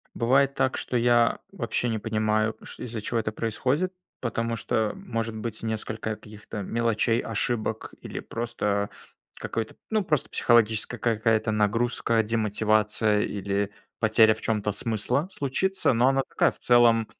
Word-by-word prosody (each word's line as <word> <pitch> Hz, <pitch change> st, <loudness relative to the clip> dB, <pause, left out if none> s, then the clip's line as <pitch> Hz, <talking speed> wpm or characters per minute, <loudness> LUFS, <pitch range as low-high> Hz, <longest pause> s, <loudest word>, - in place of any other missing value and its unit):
Бывает 135 Hz, +3 st, +3 dB
так, 130 Hz, -, +1 dB
что 125 Hz, -, -2 dB
я 120 Hz, 0 st, +3 dB
вообще 120 Hz, -, -1 dB
не 110 Hz, -1 st, -1 dB
понимаю, 110 Hz, 0 st, 0 dB
ш -, -, -9 dB
из-за 115 Hz, -2 st, -5 dB
чего 115 Hz, +2 st, -1 dB
это 110 Hz, -, -2 dB
происходит, 130 Hz, -, -1 dB, 0.3 s
потому 115 Hz, -1 st, -2 dB
что 110 Hz, 0 st, 0 dB
может 115 Hz, -, -4 dB
быть 110 Hz, 0 st, -5 dB
несколько 110 Hz, 0 st, -3 dB
каких-то 105 Hz, -1 st, -8 dB
мелочей, 115 Hz, +2 st, +1 dB
ошибок, 110 Hz, 0 st, -2 dB
или -, -, -6 dB
просто 105 Hz, -4 st, -2 dB, 0.5 s
какой-то, 110 Hz, -1 st, -4 dB
ну, 215 Hz, -2 st, +2 dB
просто 150 Hz, -6 st, 0 dB
психологическая 115 Hz, 0 st, +2 dB
какая-то 110 Hz, -1 st, +1 dB
нагрузка, 115 Hz, +2 st, +1 dB
демотивация 110 Hz, -1 st, +1 dB
или 100 Hz, 0 st, -1 dB, 0.3 s
потеря 110 Hz, 0 st, +5 dB
в 110 Hz, -, -12 dB
чём-то 105 Hz, -2 st, 0 dB
смысла 115 Hz, -, 0 dB
случится. 190 Hz, +3 st, +1 dB
Но 120 Hz, +3 st, +4 dB
она 135 Hz, 0 st, +2 dB
такая, -, -, +2 dB
в -, -, -16 dB
целом, 120 Hz, -2 st, +4 dB
115 Hz, 140 wpm, -26 LUFS, 110-120 Hz, 0.5 s, потеря